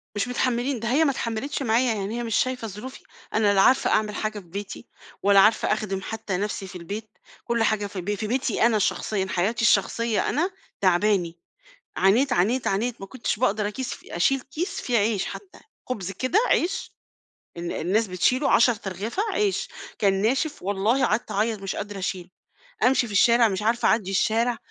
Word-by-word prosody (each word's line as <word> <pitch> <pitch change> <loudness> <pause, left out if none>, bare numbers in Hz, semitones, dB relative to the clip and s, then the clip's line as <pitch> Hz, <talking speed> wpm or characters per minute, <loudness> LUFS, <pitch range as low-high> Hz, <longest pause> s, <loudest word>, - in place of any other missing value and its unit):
مش 205 - -1
متحمّلين 250 +1 0
ده 230 - -4
هي 300 +5 +4
ما 280 - +3
اتحمّلتش 240 +3 -3
معايا 235 0 +2
يعني 205 +3 -3
هي 240 - -3
مش 225 -2 -2
شايفة 255 -3 0
ظروفي، 210 +6 -8 0.3
أنا 210 -2 +3
لا 195 - +4
عارفة 260 +6 +4
أعمل 210 -1 +1
حاجة 215 -1 -3
في 185 - -15
بيتي، 200 +6 -7 0.4
ولا 200 0 +6
عارفة 215 +1 +4
أخدم 195 -3 -3
حتّى 215 -3 -4
نفْسي 200 -1 -3
في - - -11
البيت، 205 +5 -7 0.3
كلّ 235 -1 0
حاجة 210 -2 +1
في 195 -2 -6
ب 205 +3 -2
في 215 +2 -4
بيتي 240 -1 +1
أنا 220 -3 +3
شخصيًا 195 0 0
حياتي 200 +7 0
الشخصية 225 0 +2
أنا، 335 +7 0 0.3
تعباني 180 -2 +2 0.6
عانيت، 240 +8 +3
عانيت، 235 +6 +1
عانيت، 225 +5 -1
ما 195 - -7
كنتش 235 -2 -3
باقدر 210 -4 +1
أكيس 245 +4 -5
أشيل 265 +10 +1
كيس 360 +9 -4
فيه 240 -3 +1
عيش 205 -1 +1
حتّى، 385 - -9 0.3
خبز 200 -7 -3
كده 255 - 0
عيش 380 +3 0 0.7
ال 170 0 -4
الناس 205 +6 0
بتشيله 245 - +1
10 240 +1 +5
أرغفة 210 - -3
عيش، 410 -2 0 0.3
كان 195 -2 +2
ناشف 270 +7 0
والله 205 +7 +1
قعدت 215 +1 -1
أعيّط 215 +1 0
مش 195 - -4
قادرة 205 -1 -5
أشيل، 185 -1 -4 0.5
أمشي 250 -1 +3
في 210 - -8
الشارع 235 +3 +5
مش 195 -1 -2
عارفة 230 +3 +1
اعدّي 205 -4 +1
الشارع، 230 +4 +1
220 Hz, 180 wpm, -24 LUFS, 195-245 Hz, 0.7 s, ولا